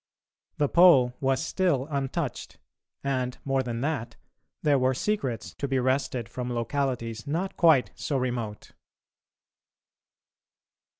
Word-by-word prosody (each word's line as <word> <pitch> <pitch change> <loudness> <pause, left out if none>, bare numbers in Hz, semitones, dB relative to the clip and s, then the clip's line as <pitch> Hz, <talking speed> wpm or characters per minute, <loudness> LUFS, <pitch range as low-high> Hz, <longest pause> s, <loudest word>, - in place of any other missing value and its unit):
The 145 - +2
Pole 140 -8 +6
was 135 +3 +1
still 165 -8 +1
untouched, 140 0 -3 0.5
and, 130 -2 -1
more 135 -1 +1
than 120 -2 -4
that, 125 -6 -2 0.5
there 145 -3 +4
were 130 0 +2
secrets 135 - -2
to 140 - -4
be 135 -1 0
wrested 130 -2 0
from 125 +1 -5
localities 120 -1 -2
not 180 +6 -2
quite 160 -7 +4
so 145 - -2
remote. 120 -5 -3
130 Hz, 115 wpm, -27 LUFS, 125-145 Hz, 0.5 s, Pole